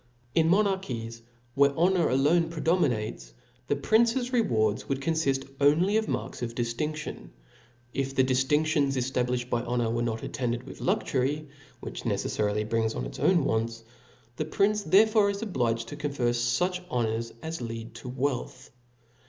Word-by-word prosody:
In 160 -1 +3
monarchies, 170 - 0 0.3
where 140 +1 +3
honor 175 0 +3
alone 155 +6 +3
J)reda 165 +1 +1
minates, 110 - -1 0.3
the 145 - +1
prince's 235 - +2
rewards 110 - +1
would 135 -1 0
confift 135 -3 0 0.2
only 165 +8 +4
of 220 0 +1
marks - - -4
of 115 -1 -4
diftmftidn, 140 +6 -3 0.6
if 135 0 -2
the 130 - +4
diftiridions 140 +2 +2
eftablifhed 125 -1 -1
by 120 - +1
honor 120 -1 -1
were 120 0 -1
not 115 -1 -2
attended 120 -2 -2
with - - -11
luxury, 145 +4 0 0.3
which, - - -6
necefTarily 105 0 -1
brings 110 0 0
on - - -3
its - - -8
wants: 115 -9 +1 0.5
the 155 - -1
prince 205 +6 +1
there. 200 +2 +6
fore 215 -2 +3
is 200 +2 -3
obliged 115 - -1
to - - -6
confer 140 -5 -1
fuch 120 +10 0
honors 115 -3 -1
as 160 -3 -4
lead 115 -1 -6
€p 125 +2 -8
wealth. 130 -1 -3
135 Hz, 150 wpm, -28 LUFS, 115-165 Hz, 0.6 s, there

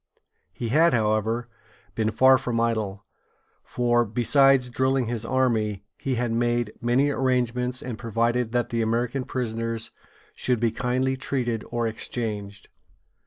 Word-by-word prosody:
He 115 +6 -5
had, 160 +4 +4
however, 110 +2 0 0.5
been 110 -1 0
far 130 +4 +5
from 120 -3 -2
idle, 110 -4 -1 0.6
for, 120 -1 +1
besides 125 +4 +3
drilling 130 +1 +1
his 115 -1 -3
army, 115 -6 0
he 135 -2 -2
had 120 -1 -1
made 120 -1 0
many 130 +4 +2
arrangements, 125 -1 0
and 120 -4 -6
provided 115 +1 0
that 120 0 0
the 115 -1 -1
American 120 +3 -1
prisoners 115 -2 -3 0.4
should 125 -3 0
be 115 -1 +1
kindly 130 +3 -1
treated 120 -4 -2
or 120 -1 -1
exchanged. 105 -3 -4
120 Hz, 130 wpm, -25 LUFS, 115-125 Hz, 0.6 s, far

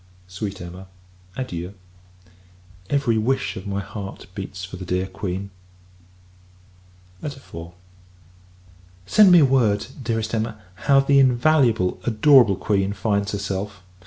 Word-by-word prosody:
Sweet 95 +2 -5
Emma 90 +2 -9 0.5
adieu! 90 -7 -5 1.1
Every 135 -6 +1
wish 130 +5 -1
of 95 - -7
my 100 0 -2
heart 100 -1 -8
beats 95 -1 -6
for 90 - -9
the 95 - -7
dear 90 +1 -1
Queen. 95 0 -5 1.7
IV. 145 -2 -5 1.7
Send 205 - +6
me 175 -3 +8
word, 120 -7 +2 0.2
Dearest 115 -2 -2
Emma! 110 -1 -2
how 135 +9 +3
the 140 0 +4
invaluable, 125 -6 +3
adorable 120 -2 +5
Queen, 100 0 0
finds 100 0 -1
herself. 100 -1 -4
105 Hz, 110 wpm, -22 LUFS, 95-130 Hz, 1.7 s, me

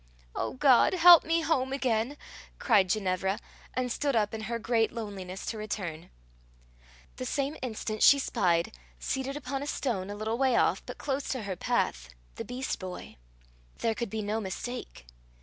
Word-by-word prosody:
"O - - -2
God, 260 +4 +5
help 350 -1 +9
me 330 +1 +1
home 275 -5 0
again," 255 0 0 0.4
cried 205 -7 +3
Ginevra, 190 0 0 0.4
and 255 -1 -1
stood 280 +1 0
up 210 -1 +1
in 220 - -4
her 235 - -1
great 225 -1 +1
loneliness 195 -5 -6
to 220 - -4
return. 190 -7 -5 1.1
The 255 - -4
same 280 +3 -1
instant 220 -3 -4
she 280 - +8
spied, 170 - +1 0.2
seated 265 - -3
upon 275 -1 -4
a 285 - -4
stone, 210 -10 -2
a 205 - -5
little 220 +3 -3
way 260 -3 +3
off, - - +2
but - - -7
close 275 -1 -3
to 255 -4 -2
her 195 -2 -3
path, - - -1 0.2
the - - -6
beast 255 +2 -4
boy. 185 - -8 0.6
There 230 - 0
could 235 0 -4
be 220 +1 -3
no 215 +2 -1
mistake. 215 - -6
230 Hz, 165 wpm, -29 LUFS, 200-265 Hz, 1.1 s, help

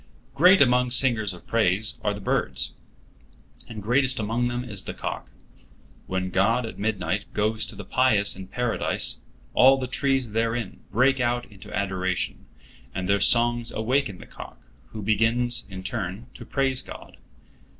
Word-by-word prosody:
Great 180 +4 +7
among 125 -1 +2
singers 120 -5 +2
of 90 - -12
praise 110 -1 +1
are 105 - +1
the - - -8
birds, 65 -8 -1 1.0
and 110 -3 -7
greatest 125 +3 +3
among 115 +3 0
them 120 0 -3
is 105 -6 -6
the - - -6
cock. - - -5 0.8
When 95 0 -2
God 110 +6 +2
at 115 - -8
midnight 105 -1 -2
goes 110 +1 +1
to - - -7
the - - -8
pious 110 -6 +2
in 95 0 -9
Paradise, 120 +4 -1 0.3
all 135 +2 +6
the 130 - -3
trees 130 -2 0
therein 115 -1 -2
break 130 +5 +3
out 120 0 0
into 100 -2 -13
adoration, 95 -2 -2 0.5
and 95 -1 -3
their 100 +1 +3
songs 120 +2 +3
awaken 110 -2 0
the - - -12
cock, - - -11 0.3
who 110 -2 -8
begins 115 +3 +1
in 95 -1 -8
turn 95 +5 -4
to - - -11
praise 135 -2 +1
God. - - -11
115 Hz, 155 wpm, -25 LUFS, 100-125 Hz, 1.0 s, Great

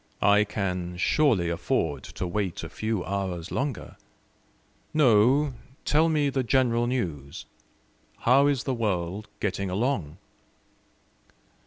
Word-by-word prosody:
I 105 +1 +5
can 90 -4 -3
surely 105 - +2
afford 80 -4 -1
to - - -5
wait 95 0 -2
a - - -6
few 110 -4 -2
hours 95 -4 -3
longer. 140 -3 -3 1.0
No, 135 +1 +4 0.3
tell 160 +2 +3
me 150 -3 +1
the 135 - 0
general 120 -2 +2
news: 80 - -3 0.8
how 135 +4 +5
is 140 -3 +1
the 135 - -1
world 100 -3 -2
getting 100 -1 -2
along? 95 - -1
105 Hz, 115 wpm, -26 LUFS, 90-130 Hz, 1.0 s, I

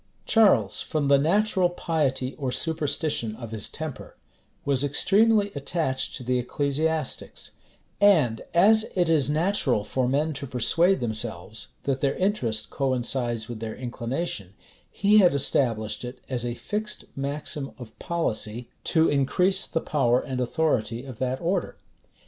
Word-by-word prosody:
Charles, 220 -3 +4
from 150 -4 -1
the 140 -1 +6
natural 185 +3 +2
piety 145 -7 -1
or 130 -3 -2
superstition 150 -7 -1
of 115 -1 -8
his 110 -2 -5
temper, 155 -3 -7 0.5
was 140 -1 +2
extremely 205 +8 +3
attached 140 -2 -2
to - - -6
the 125 +1 +1
ecclesiastics; 145 +4 -2 0.5
and 155 - +4
as 215 +5 +4
it 175 -3 +2
is 150 -4 +3
natural 155 - +1
for 130 +3 -1
men 150 +4 +1
to 140 0 -6
persuade 165 - +2
themselves 110 -3 -3
that 135 -1 -1
their 140 -1 +1
interest 125 - 0
coincides 125 -4 -1
with 120 -2 -6
their 110 -1 -5
inclination, 120 - -4 0.3
he 210 +2 +4
had 180 -7 +5
established 115 -6 0
it 125 +1 -6
as 125 -3 -2
a 120 - -3
fixed 210 - -4
maxim 140 0 -4
of 120 -4 -12
policy, 120 -9 -3
to 160 -1 +3
increase 180 +8 +2
the 165 - -1
power 125 -5 +2
and 130 -1 -4
authority 125 -3 0
of 130 -5 -9
that 130 0 -1
order. 180 +2 -1
140 Hz, 140 wpm, -25 LUFS, 120-165 Hz, 0.5 s, the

